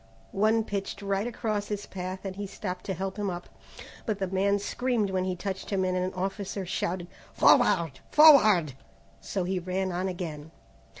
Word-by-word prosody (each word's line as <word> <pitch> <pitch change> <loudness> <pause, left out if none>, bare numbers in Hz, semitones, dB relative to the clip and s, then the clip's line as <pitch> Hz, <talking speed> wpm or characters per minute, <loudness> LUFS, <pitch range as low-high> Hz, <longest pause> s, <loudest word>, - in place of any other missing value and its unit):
One 220 +3 +2
pitched 200 -1 -4
right 200 +2 0
across 215 -3 -2
his 205 -1 -4
path 185 +1 -6
and 190 -1 -4
he 200 0 -5
stopped 185 -2 -6
to 190 - -2
help 190 +3 -4
him 205 -1 -1
up, 175 -1 -6 0.6
but 215 -3 0
the 195 - -1
man 195 +2 +1
screamed 225 0 -1
when 185 -1 0
he 185 -1 -1
touched 190 +1 -5
him 190 -2 +1
and 185 0 0
an 185 0 0
officer 195 +1 -3
shouted, 175 0 -2 0.3
"Forward! 165 -6 +4
Forward!" 215 - +7 0.5
so 190 - -3
he 185 +1 -1
ran 185 +1 -2
on 180 +2 -1
again. 160 -5 -5
190 Hz, 175 wpm, -28 LUFS, 185-205 Hz, 0.6 s, Forward